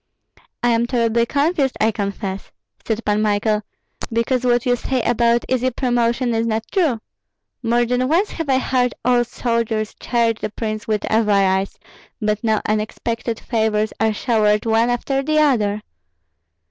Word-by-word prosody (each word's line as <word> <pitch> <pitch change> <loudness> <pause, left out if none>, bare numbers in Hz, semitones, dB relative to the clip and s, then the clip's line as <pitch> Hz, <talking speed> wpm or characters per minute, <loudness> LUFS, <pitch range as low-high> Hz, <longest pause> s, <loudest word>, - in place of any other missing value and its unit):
"I 240 - +4
am 235 +1 +2
terribly 235 -1 +1
confused, 285 -1 +1
I 220 +1 +3
confess," 200 -2 -4 0.3
said 225 0 -3
Pan 210 0 +1
Michael, 210 0 +1 0.5
"because 235 +2 0
what 240 -1 +2
you 245 -1 +3
say 255 0 -2
about 235 0 +2
easy 255 0 +1
promotion 240 -1 0
is 225 0 0
not 220 0 -1
true. 315 - +1 0.6
More 240 0 +2
than 250 +1 0
once 350 +8 +2
have 325 -4 -5
I 265 - +4
heard 250 -2 0
old 240 -1 +3
soldiers 230 -3 -1
charge 230 -2 0
the - - -3
prince 215 0 -4
with 215 -2 0
avarice, 195 -3 +2 0.4
but 210 0 -1
now 220 -2 +1
unexpected 225 +2 -2
favors 220 -2 0
are 220 0 +2
showered 210 -1 +1
one 225 +1 +2
after 270 +3 0
the 310 +2 0
other." 215 -9 +2
230 Hz, 150 wpm, -20 LUFS, 215-250 Hz, 0.6 s, I